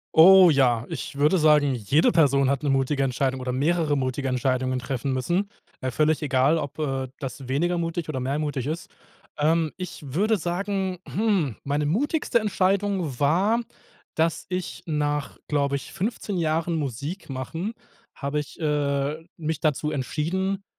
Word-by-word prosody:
Oh 185 +2 +9
ja, 125 -6 +3
ich - - -5
würde 150 +6 +4
sagen, 150 -3 +4
jede 125 +6 +2
Person 140 -5 +4
hat 140 +1 0
'ne 145 - +1
mutige 135 +1 +1
Entscheidung 130 0 0
oder 125 -1 -3
mehrere 155 +3 +1
mutige 135 0 -1
Entscheidungen 130 0 0
treffen 130 +1 -2
müssen. 175 +10 0 0.3
Äh, 130 - -2
völlig 155 +4 +1
egal, 140 +1 +3
ob, 145 -1 -5
äh, 135 -3 -1
das 135 -2 -6
weniger 170 +7 0
mutig 165 -1 -3
oder 135 -4 -2
mehr 135 +3 -1
mutig 145 -4 -2
ist. 160 +2 -4 0.5
Ähm, 155 +1 +2
ich 185 -2 -7
würde 200 - +1
sagen, 190 +2 -2
hm, 195 - 0
meine 145 +1 0
mutigste 235 - +1
Entscheidung 190 - 0
war, 190 +11 +3 0.5
dass 165 0 0
ich 180 -1 -4
nach, 150 -2 -1
glaube 140 -1 +1
ich, 135 - -10
15 205 -1 -3
Jahren 165 0 0
Musik 145 - -4
machen 160 - -4 0.4
habe 140 +1 -2
ich, 145 - -12
äh, 145 0 0
mich 160 -2 -3
dazu 150 0 0
entschieden, 180 +8 -2
150 Hz, 155 wpm, -25 LUFS, 135-175 Hz, 0.5 s, Oh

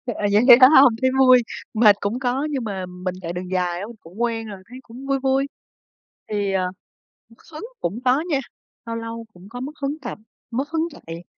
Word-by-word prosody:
Ờ, 205 - -1
vậy 210 +3 +4
vậy 245 -2 +11
phải 255 - +9
hông? 270 -5 +7
Thấy 260 - +3
vui, 255 -2 +7 0.3
mệt 215 -2 +6
cũng 215 +5 -2
có 260 +3 -1
nhưng 270 -4 -2
mà 195 -4 -4
mình 180 0 -6
chạy 170 0 -5
đường 180 +1 -6
dài 180 -1 -1
á, 200 - -5
mình 235 - -11
cũng 180 +8 -11
quen 230 -2 -1
rồi, 200 -2 -8
thấy 255 +2 -10
cũng 255 +4 -11
vui 275 0 +1
vui. 270 +1 +1 0.8
Thì, 205 -2 -1
ờ, 185 -1 +1 0.6
mất 230 - -19 0.2
hứng 310 +9 -7 0.2
cũng 200 +7 -2
có 260 +4 +3
nha, 280 -3 +1 0.5
lâu 230 0 -4
lâu 230 0 -6
cũng 180 +3 -15
có 245 +1 -8
mất 280 +3 -5
hứng 290 +3 -2
tập, 240 - -6 0.3
mất 270 +5 -2
hứng 325 +1 -1
chạy. 165 - -10
230 Hz, 220 wpm, -22 LUFS, 195-265 Hz, 0.8 s, vậy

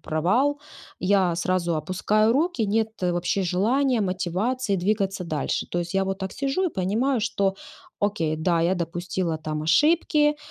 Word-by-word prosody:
провал 235 - +1 0.4
я 185 -2 +2
сразу 175 0 0
опускаю 190 +7 +1
руки, 295 -4 +1
нет 220 +2 +1
вообще 180 +2 0
желания, 230 +8 +1
мотивации 195 +5 -1
двигаться 195 0 -1
дальше. 155 -4 -2
То 175 - -1
есть 170 +2 -5
я 195 0 +2
вот 195 0 -3
так 190 -1 -4
сижу 275 +7 -1
и, - - +2
понимаю, 225 - 0
что: 200 -3 0 0.5
"Окей, 170 -7 0
да, 165 +1 +1
я 175 +3 +2
допустила 175 0 -2
там 155 -1 -4
ошибки, 295 - +3
190 Hz, 150 wpm, -24 LUFS, 175-225 Hz, 0.5 s, ошибки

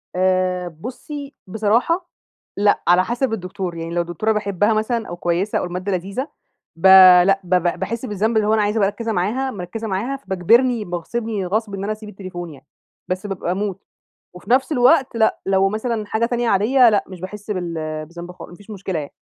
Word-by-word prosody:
آآ، 185 -1 +1
بصي 265 - -8
بصراحة، 230 - 0 0.5
لأ 205 0 +2
على 180 +1 +5
حسب 240 +2 -1
الدكتور. 185 -3 -4
يعني 165 0 -5
لو 175 - +2
الدكتورة 175 +6 -1
باحبها 205 0 +1
مثلًا 220 +1 -1
أو 175 - -6
كويسة 175 +4 -1
أو - - -3
المادة 180 +3 -4
لذيذة، 195 - -3 0.5
با 185 0 +8
لأ، 195 0 +2
ب 180 +1 +1
ب 175 -1 0
باحس 230 +6 -3
بالذنب 220 +2 0
اللي 210 - +2
هو 215 - +3
أنا 215 - +3
عايزة 210 +2 0
أبقى 200 -2 +3
مركزة 230 +1 -4
معاها 235 +8 -1
مركزة 210 +3 -6
معاها 220 +8 -2
فباجبرني 225 +3 +2
باغصبني 200 +4 -3
غصب 210 +2 -2
إن 195 0 -4
أنا 210 - -2
أسيب 215 -1 -10
التليفون 185 -4 -7
يعني، 140 - -17 0.4
بس 185 +3 -3
بابقى 185 -2 -3
هاموت. 195 0 -3 0.5
وفي 180 - -12
نفس 265 +4 +3
الوقت 260 0 +3
لأ، 220 -1 +2
لو 195 0 +3
مثلًا 215 +1 -2
حاجة 220 +2 0
تانية 240 -1 -1
عادية 240 +5 +5
لأ، 205 -2 +2
مش 185 -2 -11
باحس 210 +3 -7
بال 175 -3 -3 0.3
بالذنب 170 +2 -9
خالص، 180 - -11
مافيش 205 +4 -15
مشكلة 190 -4 -4
يعني. 145 - -7
200 Hz, 190 wpm, -20 LUFS, 180-225 Hz, 0.5 s, با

